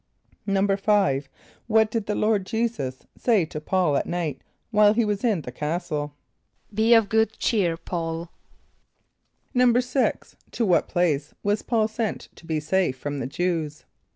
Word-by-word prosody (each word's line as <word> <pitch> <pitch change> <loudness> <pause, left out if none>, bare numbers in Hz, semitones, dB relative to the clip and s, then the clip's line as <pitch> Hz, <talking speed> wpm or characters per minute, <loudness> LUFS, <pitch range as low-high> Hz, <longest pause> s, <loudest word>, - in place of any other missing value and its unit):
= - - -35
=5.= 195 -7 +2 0.4
What 220 -1 +3
did 225 -2 -2
the 210 - 0
Lord 210 -2 +2
J[=e]´[s+]us 220 - -2
say 220 -8 +2
to 150 -1 -7
P[a:]ul 175 -2 +1
at - - 0
night 170 -6 -3 0.3
while 210 -1 +5
he 235 -1 +3
was 210 +1 -2
in 215 -9 +2
the 125 - -7
castle? 150 0 -3 0.6
="Be 220 +3 +5
of 225 -2 +4
good 220 +1 +1
cheer, 185 -8 +1
P[a:]ul!"= 165 -1 -4 1.2
=6.= 250 +1 +2 0.2
To 235 - 0
what 180 -4 +3
place 155 -5 0
was 205 +1 +1
P[a:]ul 225 -3 +1
sent 220 -1 -3
to 165 - -16
be 160 -1 0
safe 155 -2 0
from 145 +2 -4
the 125 - -3
Jew[s+]? 160 0 -2
190 Hz, 155 wpm, -25 LUFS, 155-220 Hz, 1.2 s, while